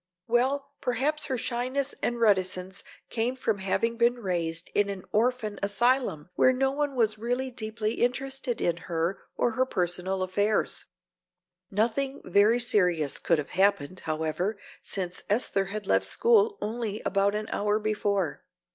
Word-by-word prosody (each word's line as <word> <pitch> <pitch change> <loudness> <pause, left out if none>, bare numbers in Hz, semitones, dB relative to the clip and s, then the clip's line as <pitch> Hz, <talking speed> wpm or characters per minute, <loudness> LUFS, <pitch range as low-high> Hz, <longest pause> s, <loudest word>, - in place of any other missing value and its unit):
"Well, 270 +4 +1
perhaps 280 +5 0
her 265 -3 -2
shyness 255 +3 -1
and 240 0 -1
reticence 190 -3 +1 0.3
came 240 +3 0
from 225 -5 -1
having 230 +5 0
been 235 +1 +3
raised 170 -6 -2
in 205 0 +2
an 195 -2 -5
orphan 225 -1 0
asylum 205 - +1
where 255 - +5
no 265 +1 +1
one 290 0 -1
was 220 -3 +1
really 245 +3 -1
deeply 220 -2 -3
interested 260 0 -1
in 170 -1 +1
her 170 +2 -2 0.2
or 240 - +1
her 255 +3 +1
personal 185 -1 -1
affairs. 205 +3 0 0.8
Nothing 240 +7 0
very 205 +6 +4
serious 180 - +2
could 165 - +2
have 150 - -4
happened, 185 -3 +1
however, 160 +6 -2 0.2
since 185 -2 -3
Esther 200 -2 +1
had 205 +1 -5
left - - +2
school 445 -2 +3
only 220 -1 -3
about 200 +1 +2
an 215 0 -2
hour 210 +1 +1
before." 205 -5 -1
215 Hz, 145 wpm, -27 LUFS, 190-250 Hz, 0.8 s, where